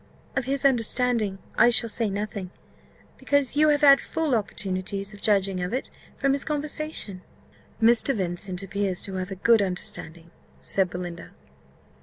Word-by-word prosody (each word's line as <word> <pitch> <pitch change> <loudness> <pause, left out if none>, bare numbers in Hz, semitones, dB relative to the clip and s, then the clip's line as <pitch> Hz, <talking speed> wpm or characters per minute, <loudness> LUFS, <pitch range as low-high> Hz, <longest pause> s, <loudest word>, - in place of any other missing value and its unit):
Of 265 - -1
his 275 +1 -2
understanding 235 -4 +1 0.2
I - - +7
shall 235 0 +6
say 225 -1 -1
nothing, 200 -1 -4 0.7
because 285 -2 +1
you 305 +1 +4
have 290 -1 +2
had 280 -2 +7
full 320 -4 -2
opportunities 195 -2 -3
of 205 - -13
judging 195 -3 +1
of 180 +4 -3
it 260 - -4 0.3
from 275 -1 +1
his 275 - -1
conversation." 300 - -3 0.6
"Mr. 235 +4 +4
Vincent 185 0 -2
appears 195 -1 -2
to 195 - 0
have 185 0 -4
a 195 - -5
good 225 +3 +4
understanding," 170 -3 -5 0.3
said 190 -2 +1
Belinda. 175 -1 -7
210 Hz, 150 wpm, -25 LUFS, 190-265 Hz, 0.7 s, I